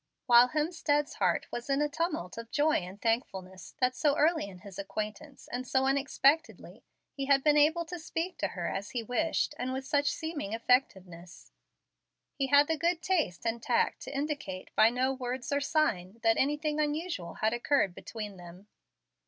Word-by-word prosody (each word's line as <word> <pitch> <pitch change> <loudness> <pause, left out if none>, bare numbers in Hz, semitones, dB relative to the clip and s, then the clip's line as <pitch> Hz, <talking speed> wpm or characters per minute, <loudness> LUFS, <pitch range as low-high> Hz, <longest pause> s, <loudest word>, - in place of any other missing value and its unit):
While 240 0 +7
Hemstead's 300 -1 0
heart - - +1
was 240 +3 -6
in 275 0 +2
a 295 - +2
tumult 295 - -3
of 230 0 -8
joy 305 +4 +2
and 185 +3 -7
thankfulness 190 -6 -3
that 255 0 +2
so 290 -2 +2
early 315 -5 +2
in 185 -3 -12
his 200 -2 -10
acquaintance, 210 +8 -6
and 250 +1 -4
so 265 +1 +2
unexpectedly, 280 +3 +1 0.3
he 275 - -4
had 275 -1 +3
been 300 -1 +4
able 315 +3 +3
to 355 +2 -7
speak 330 +3 -4
to - - +1
her - - -4
as 200 +1 -4
he 240 -2 -3
wished 295 +8 0
and 255 +1 -2
with 265 0 -4
such 285 0 +2
seeming 315 -10 -4
effectiveness, 190 -8 -1 0.8
he 275 -1 -1
had 285 +1 +5
the 320 - 0
good 340 +1 0
taste 320 - 0
and 230 0 -1
tact - - +1
to - - -7
indicate 280 -11 -4
by 220 - +6
no 255 +3 0
words 255 0 -4
or 285 - +1
sign 230 - 0
that 225 0 +4
anything 295 +2 0
unusual 300 - -2
had 220 +1 0
occurred 240 -5 +1
between 210 0 -7
them. 175 +2 -12
265 Hz, 175 wpm, -30 LUFS, 215-300 Hz, 0.8 s, While